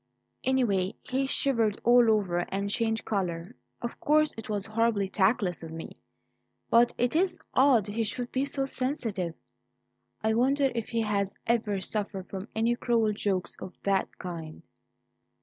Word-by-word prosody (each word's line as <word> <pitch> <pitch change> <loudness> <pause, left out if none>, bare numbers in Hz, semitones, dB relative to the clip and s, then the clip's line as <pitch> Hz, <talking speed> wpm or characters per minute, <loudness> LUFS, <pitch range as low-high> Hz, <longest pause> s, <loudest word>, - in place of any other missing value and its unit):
"Anyway, 215 -8 +1
he 265 +1 -1
shivered 230 -7 +1
all 240 -1 +6
over 195 -5 +2
and 200 +1 -2
changed 225 0 0
colour. 180 0 -2 0.3
Of 235 - -4
course 305 +1 +3
it 225 - -8
was 205 -2 -1
horribly 220 -2 +1
tactless 190 -1 +1
of 165 - -7
me, 165 0 -8 0.7
but 240 +1 +6
it's 335 +9 +1 0.2
odd 255 -6 +5
he 215 +2 -1
should 240 +2 -3
be 265 - 0
so 275 -1 -1
sensitive. 230 - -2 0.9
I 220 0 +2
wonder 270 +4 +3
if 230 -2 -3
he 230 -1 0
has 200 -2 -1
ever 220 -4 +1
suffered 195 -1 -3
from 195 +1 -6
any 230 +2 +2
cruel 230 -3 +1
jokes 195 -3 -1
of 185 0 -9
that 195 -1 0
kind." 165 -3 -7
220 Hz, 150 wpm, -28 LUFS, 195-245 Hz, 0.9 s, all